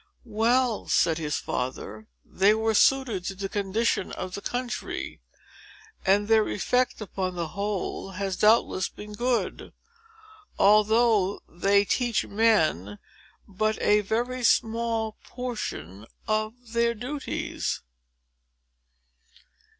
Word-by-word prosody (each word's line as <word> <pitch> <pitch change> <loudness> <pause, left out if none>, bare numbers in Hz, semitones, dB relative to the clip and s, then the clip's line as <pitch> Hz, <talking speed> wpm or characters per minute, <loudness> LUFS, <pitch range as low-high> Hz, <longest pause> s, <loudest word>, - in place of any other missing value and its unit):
"Well," 235 +1 +1
said 165 -1 +2
his 150 -2 -2
father, 110 -4 -4 0.2
"they 200 +3 +3
were 220 0 +1
suited 240 -5 +3
to 195 - -3
the 195 +1 -4
condition 205 +1 -1
of 185 0 -6
the 200 - -5
country; 245 +2 -4 0.8
and 200 +2 +3
their 220 -1 +4
effect, 250 +4 0
upon 185 -3 -3
the 170 -2 -3
whole, 200 0 -3
has 195 0 -2
doubtless 210 -3 +3
been 210 0 -10
good,—although 240 - 0
they 200 +3 +2
teach 240 +1 0
men 160 - +2 0.5
but 215 +2 -1
a 210 0 +4
very 240 +5 -2
small 225 -1 +1
portion 115 - -6 0.2
of 215 +1 0 0.2
their 235 0 +2
duties." 260 +6 -4
215 Hz, 105 wpm, -26 LUFS, 195-235 Hz, 0.8 s, their